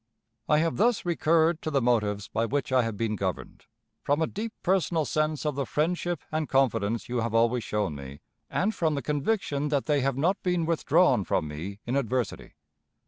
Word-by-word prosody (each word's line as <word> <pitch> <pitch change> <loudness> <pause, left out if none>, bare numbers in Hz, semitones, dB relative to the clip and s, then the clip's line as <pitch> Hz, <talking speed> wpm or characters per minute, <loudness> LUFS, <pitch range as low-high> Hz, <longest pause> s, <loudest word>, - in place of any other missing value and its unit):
"I 150 - +5
have 165 +1 +1
thus 225 0 +2
recurred 165 -1 +2
to - - -3
the 140 -3 +2
motives 105 -5 +1
by 115 +1 -1
which 135 +1 -2
I 130 -1 +4
have 115 -3 -3
been 110 -1 -1
governed, 95 -3 -4 0.4
from 145 +2 +1
a 160 - +2
deep 215 +7 -5
personal 175 -4 +1
sense 155 +3 -1
of 150 - +1
the 135 -2 -3
friendship 170 +2 -1
and 155 -1 -2
confidence 115 -5 +1
you 125 - -2
have 115 -1 -1
always 115 +1 +3
shown 105 -8 -1
me, 70 0 -9 0.3
and 210 +4 0
from 160 -6 0
the 140 - -3
conviction 150 - -1
that 145 -2 0
they 150 -3 +2
have 135 0 0
not 180 +8 +1
been 180 -2 0
withdrawn 160 - +3
from 85 -3 0
me 90 +8 -7
in 125 - -2
adversity. 125 -3 -2
140 Hz, 195 wpm, -27 LUFS, 115-160 Hz, 0.4 s, I